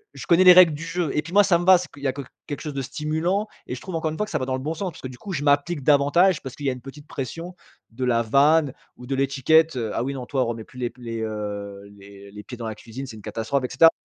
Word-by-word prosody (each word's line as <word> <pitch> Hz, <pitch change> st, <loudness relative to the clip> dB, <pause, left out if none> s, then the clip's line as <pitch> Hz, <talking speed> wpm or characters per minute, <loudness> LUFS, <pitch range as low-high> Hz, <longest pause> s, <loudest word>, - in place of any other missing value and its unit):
je -, -, -8 dB
connais 175 Hz, +2 st, +5 dB
les 180 Hz, -, +11 dB
règles 175 Hz, -4 st, +7 dB
du 150 Hz, -, -7 dB
jeu 165 Hz, -2 st, -2 dB
et 150 Hz, -, +2 dB
puis, 170 Hz, +3 st, -10 dB
moi, 205 Hz, +1 st, +7 dB
ça 170 Hz, -3 st, +3 dB
me 175 Hz, -, -3 dB
va. 185 Hz, -1 st, +8 dB
C'est 180 Hz, -, -6 dB
qu'il 140 Hz, -, -14 dB
y -, -, +1 dB
a 130 Hz, -, 0 dB
que 140 Hz, -, -6 dB, 0.3 s
quelque 145 Hz, -3 st, -5 dB
chose 150 Hz, -3 st, -5 dB
de 135 Hz, -, -2 dB
stimulant, 160 Hz, -, -1 dB, 0.2 s
et 125 Hz, -, -4 dB
je 125 Hz, -, -10 dB
trouve, 185 Hz, -, -8 dB
encore 160 Hz, -1 st, -1 dB
une 155 Hz, -, -6 dB
fois, 210 Hz, -, 0 dB
que -, -, -12 dB
ça 155 Hz, -, 0 dB
va 130 Hz, -, -2 dB
dans 130 Hz, -, -2 dB
le 130 Hz, -, -4 dB
bon 155 Hz, +4 st, -2 dB
sens. 185 Hz, +2 st, -3 dB
Parce -, -, -14 dB
que, 130 Hz, -, -5 dB
du 125 Hz, -, -11 dB
coup, 195 Hz, -, -7 dB
je 145 Hz, -4 st, -2 dB
m'applique 145 Hz, +1 st, +1 dB
davantage 150 Hz, +6 st, +4 dB
parce 130 Hz, -, -7 dB
qu'il 145 Hz, -, -8 dB
y -, -, +4 dB
a 130 Hz, -, -1 dB
une 125 Hz, -, -10 dB
petite 145 Hz, +2 st, -11 dB
pression, 165 Hz, +7 st, -6 dB, 0.4 s
de 125 Hz, +3 st, -3 dB
la 115 Hz, -2 st, +2 dB
vanne 140 Hz, +4 st, +3 dB, 0.2 s
ou 125 Hz, -, -11 dB
de 135 Hz, -, -2 dB
l'étiquette: 140 Hz, +4 st, +3 dB
«Heu, 115 Hz, -3 st, -2 dB
ah 120 Hz, -, -1 dB
oui, 140 Hz, -, -3 dB
non, 130 Hz, -2 st, -6 dB
toi, 130 Hz, 0 st, 0 dB
remets 115 Hz, -1 st, -4 dB
plus 125 Hz, -, -14 dB
les 120 Hz, -, -1 dB
p 125 Hz, +1 st, -20 dB
les, 115 Hz, -1 st, -5 dB
heu, 105 Hz, -2 st, -5 dB
les 100 Hz, 0 st, -14 dB
les 105 Hz, 0 st, -10 dB
pieds 125 Hz, -, -9 dB
dans 115 Hz, -, -6 dB
la 110 Hz, -, -5 dB
cuisine, 120 Hz, +5 st, -8 dB
c'est 110 Hz, -3 st, -9 dB
une -, -, -12 dB
catastrophe» 115 Hz, +4 st, -2 dB
et -, -, -4 dB
cetera. 165 Hz, +5 st, +6 dB
140 Hz, 325 wpm, -23 LUFS, 125-165 Hz, 0.4 s, les